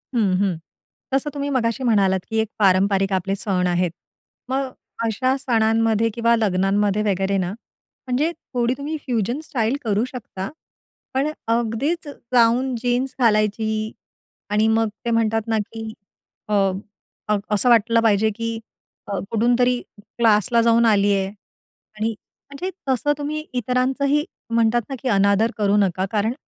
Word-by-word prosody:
हं, 210 -5 +2
हं. 195 -4 +1 0.6
तसं 275 +2 +1
तुम्ही 285 0 -3
मगाशी 250 -1 0
म्हणालात 200 -5 +3
की 225 - -2
एक 220 - +1
पारंपरिक 195 0 +3
आपले 195 +1 0
सण 190 -3 0
आहेत. 175 -1 +1 0.6
मग 265 0 -1 0.3
अशा 255 +4 +1
सणांमध्ये 225 -2 +2
किंवा 235 0 +3
लग्नांमध्ये 205 0 +1
वगैरे 195 -1 0
ना 180 -1 -1 0.6
म्हणजे 280 +7 +1
थोडी 245 -6 -2
तुम्ही 300 +3 -4
फ्युजन 240 +1 -1
स्टाईल 235 -3 -1
करू 215 -1 +1
शकता. 220 -6 -7 0.6
पण 270 +3 +1 0.2
अगदीचं 240 +8 -1 0.2
जाऊन 245 +2 +4
जीन्स 250 +2 0
घालायची 215 -1 +1 0.6
आणि 210 +1 +2
मग 225 0 +2 0.2
ते 235 - 0
म्हणतात 225 0 +1
ना 225 - +1
की 225 -1 -6 0.5
अ, 210 - -2 0.7
अ, 210 -1 +2
असं 210 +4 +3
वाटलं 230 0 +4
पाहिजे 220 -1 +3
की 230 0 -3 0.5
अ, 200 -1 -2
कुठूनतरी 245 +2 +2 0.2
क्लासला 230 +1 +2
जाऊन 230 0 +4
आलीये 200 -2 +3
आणि 215 +2 -8 0.4
म्हणजे 320 +7 -4 0.2
तसं 265 +3 +2
तुम्ही 305 +1 -3
इतरांचही 260 +4 +1 0.3
म्हणतात 230 +1 +3
ना, 270 - -3
की 265 - -5
अनादर 200 +2 +3
करू 205 -1 +2
नका, 190 -2 +1
कारण 215 +2 +1
225 Hz, 135 wpm, -22 LUFS, 205-250 Hz, 0.7 s, जाऊन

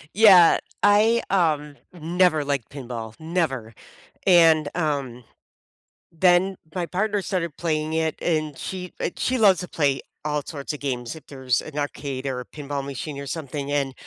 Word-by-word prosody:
Yeah, 195 -6 +8 0.2
I, 215 +3 +4
um, 150 -6 +1 0.2
never 170 -1 +2
liked 140 -5 -2
pinball, 120 -5 -7
never, 160 -9 -2 0.5
and, 165 -5 +6
um, 140 -7 -2 0.9
then 180 +3 +3 0.2
my 175 -2 -2
partner 205 +3 -1
started 175 -5 -3
playing 155 -2 -1
it, 160 -1 0
and 155 -4 -1
she 180 -1 -6
uh, - - 0
she 255 - 0
loves 200 -5 +5
to 180 - -6
play 140 -4 0 0.2
all 150 -1 0
sorts 145 -1 -5
of 150 - -8
games 125 -4 -3
if 160 - -13
there's 130 -3 -1
an 150 -1 -8
arcade, 140 -2 -4
or 130 -2 -2
a 125 - -7
pinball 145 -2 -5
machine, 140 +1 -6
or 140 - -6
something, 145 -2 -5
and 140 -2 0
155 Hz, 160 wpm, -24 LUFS, 140-175 Hz, 0.9 s, Yeah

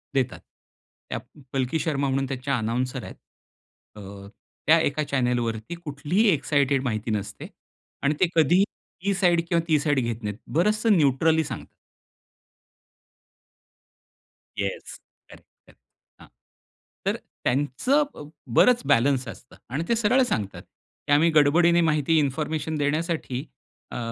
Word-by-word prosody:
देतात. 130 -2 0 0.7
त्या - - -3 0.3
पलकी 135 +3 0
शर्मा 140 -3 0
म्हणून 135 +1 0
त्याच्या 135 +1 -2
अनाउन्सर 125 +2 -2
आहेत. - - -9 0.8
अ, 105 - -10 0.7
त्या 165 +2 +7
एका 150 +2 -1
चॅनेलवरती 125 -2 -1
कुठलीही 170 +6 0
इक्सायटेड 140 -2 +1
माहिती 110 -3 -2
नसते 105 -2 -4 0.6
आणि 140 - +3
ते 185 - +4
कधीही 170 +5 +5 0.4
ही 200 - +2
साईड 175 -3 +3
किंवा 170 -1 +2
ती 155 -2 +3
साईड 145 -2 +1
घेत 115 -2 -3
नाहीत. 105 0 -4 0.2
बरंचसं 210 +4 +3
न्यूट्रली 160 +3 +3
सांगतात. 135 -6 -8 2.8
येस. 100 -1 -4 0.3
करेक्ट, - - -15 0.2
करेक्ट - - -22 0.4
हां. - - -14 0.8
तर - - +1 0.3
त्यांचं 145 - +1
ब 145 - -10 0.3
बरंच 250 -1 +6
बॅलन्स 130 +2 +3
असतं. 120 +3 -11
आणि 140 +6 -2
ते 235 - +3
सरळ 230 +4 +3
सांगतात 105 - -3
की - - -12
आम्ही 155 +4 +5
गडबडीने 170 +4 +5
माहिती 155 -1 +2
इन्फॉर्मेशन 155 +2 -2
देण्यासाठी 150 -2 -1 0.5
अ, - - -4
145 Hz, 125 wpm, -25 LUFS, 130-165 Hz, 2.8 s, त्या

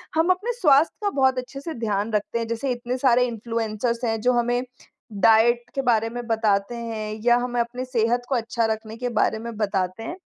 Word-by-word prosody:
हम 325 +3 +2
अपने 410 +6 -1
स्वास्थ्य 290 -1 +4
का 410 - +1
बहुत 265 -5 +2
अच्छे 255 +2 -5
से 325 +2 -5
ध्यान 215 -3 -2
रखते 210 +2 -1
हैं 230 - -3
जैसे 230 +4 -2
इतने 245 +1 -3
सारे 250 -1 +4
इन्फ्लुएंसर्स 230 +1 -3
हैं 225 -1 0
जो 250 +3 +3
हमें 245 +1 0 0.6
डाइट 235 +2 +4
के 275 - 0
बारे 225 -3 +2
में 245 +1 -6
बताते 220 -1 +1
हैं 220 -2 -5
या 240 0 +5
हमें 245 0 -2
अपनी 240 +2 -4
सेहत 240 -1 +1
को 270 - +1
अच्छा 230 -1 -1
रखने 220 0 -3
के 245 +1 -2
बारे 220 - +2
में 230 0 -6
बताते 195 -1 -1
हैं। 340 - -5
235 Hz, 205 wpm, -24 LUFS, 225-250 Hz, 0.6 s, या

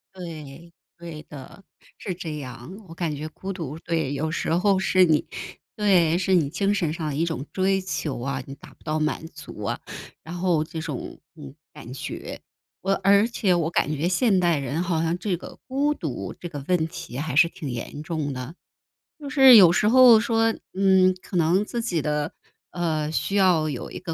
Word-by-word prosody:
对， 170 -2 -9 0.2
对 165 -3 -9
的。 145 +7 -12 0.3
是 185 - -4
这 160 -4 -6
样。 135 +7 -8
我 165 - -10
感 165 -3 -3
觉 155 +2 -5
孤 195 +4 -6
独 160 -3 -6
对， 160 -5 -2
有 155 +3 -2
时 165 - -2
候 195 +2 +3
是 185 -1 +3
你 155 -2 +2 0.5
对， 180 -6 +3
是 190 +1 0
你 150 -5 +2
精 200 +5 0
神 165 -6 -1
上 165 -3 -4
的 140 - -3
一 165 +3 +1
种 160 -4 -4
追 190 0 +1
求 155 -8 -3
啊， 135 0 -3
你 135 - -8
达 - - -15
不 - - -26
到 155 0 -1
满 155 +1 -1
足 145 -9 -10
啊， - - -2 0.4
然 165 +2 -8
后 175 -3 +1
这 160 0 -6
种， 150 -5 -6 0.2
嗯， 140 -3 -11 0.2
感 135 -4 -10
觉。 135 - -7 0.4
我 195 +1 +1
而 200 +3 +5
且 205 -6 +1
我 165 -2 +1
感 155 -2 0
觉 160 +5 -1
现 195 0 +2
代 170 -3 +2
人 140 +4 -2
好 170 -3 0
像 165 +2 0
这 185 -2 -2
个 - - -11
孤 285 +3 +1
独 135 - -5
这 175 - -6
个 145 -4 -7
问 175 -3 +1
题 165 -7 -8
还 150 -2 -3
是 165 - +6
挺 150 -4 -7
严 120 +4 -6
重 155 -4 -3
的。 130 +6 -7 0.6
就 285 -1 -7
是 265 -4 +8
有 180 -5 +9
时 210 +4 +2
候 245 -2 +8
说， 225 0 +2 0.2
嗯， 190 -1 +4
可 - - -9
能 175 +5 +3
自 235 +1 -3
己 175 -9 -1
的， 150 +1 -1 0.4
呃， 155 -3 -1
需 195 - -2
要 180 -5 +4
有 - - -5
一 - - -7
个 170 -3 -5
170 Hz, 215 characters per minute, -24 LUFS, 150-190 Hz, 0.6 s, 有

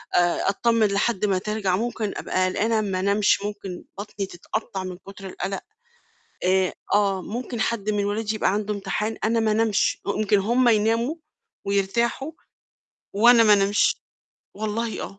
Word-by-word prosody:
آآ 175 +2 +2
أتطمن 230 +1 +2
لحد 200 +1 0
ما 195 -2 +1
ترجع، 200 -1 -1
ممكن 220 -1 -2
أبقى 185 0 0
قلقانة 220 +3 +1
ما 190 -3 -2
أنامش، 200 +2 +2
ممكن 205 -3 -6
بطني 200 0 -5
تتقطّع 190 +2 -5
من 185 -1 -6
كتر 195 +1 -12
القلق. 195 +1 -4 0.8
آآ 185 0 +2 0.2
آه، 200 -2 +2
ممكن 235 +3 -5
حد 220 -2 -1
من 205 -1 0
ولادي 215 +1 -1
يبقى 200 - +1
عنده 210 0 -1
امتحان 210 +2 -3
أنا 230 +1 +2
ما 220 -1 +2
أنامش، 220 -1 +1
ممكن 205 0 +1
هم 240 +5 +3
يناموا 230 +6 +2 0.5
ويرتاحوا 235 +8 0 0.8
وأنا 230 +3 +6
ما 215 - +6
أنامش، 205 +1 +3 0.6
والله 220 +2 -3
آه. 195 - -8
210 Hz, 145 wpm, -24 LUFS, 195-225 Hz, 0.8 s, وأنا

